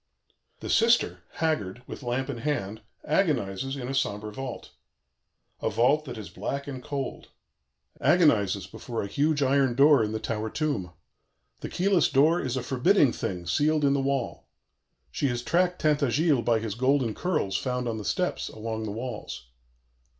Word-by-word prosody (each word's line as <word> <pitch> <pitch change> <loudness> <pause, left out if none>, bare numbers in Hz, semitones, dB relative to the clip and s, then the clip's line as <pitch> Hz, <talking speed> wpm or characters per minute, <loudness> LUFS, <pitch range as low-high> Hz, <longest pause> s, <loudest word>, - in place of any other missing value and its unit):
"The - - -6
sister, 230 +1 +3
haggard, 125 - -2
with - - -8
lamp 125 +1 -2
in 140 -4 -4
hand, 110 -7 -2 0.2
agonizes 135 - 0
in 125 -3 -5
a 135 - -3
sombre 105 -5 -1
vault, 135 +1 -7 0.9
a - - 0
vault 145 +6 +2
that 125 -4 -7
is 110 - -7
black 140 0 -4
and 130 -3 -7
cold; 140 -3 -4 0.7
agonizes 145 - +3
before 115 -3 -5
a - - -4
huge 145 +6 +1
iron 135 -2 +2
door 140 -2 +6
in 105 - -2
the 110 - -2
tower 110 0 -3
tomb. 115 - -2 0.7
The - - -6
keyless 185 -2 +2
door 155 +6 +4
is 130 -1 -2
a 125 - -2
forbidding 135 - +3
thing 90 -2 -4
sealed 150 - +2
in 140 - +4
the 140 - +1
wall. 135 -2 -2 0.6
She 140 - 0
has 120 -1 -2
tracked 180 +3 +1
Tintagiles 145 -2 +2
by 115 -1 +3
his 110 -2 -3
golden 130 0 +1
curls 155 - -1
found 125 +1 -1
on 110 -1 -2
the - - -6
steps, - - -1
along 110 0 -5
the 105 - -4
walls. 115 - -6
130 Hz, 165 wpm, -27 LUFS, 110-150 Hz, 0.9 s, door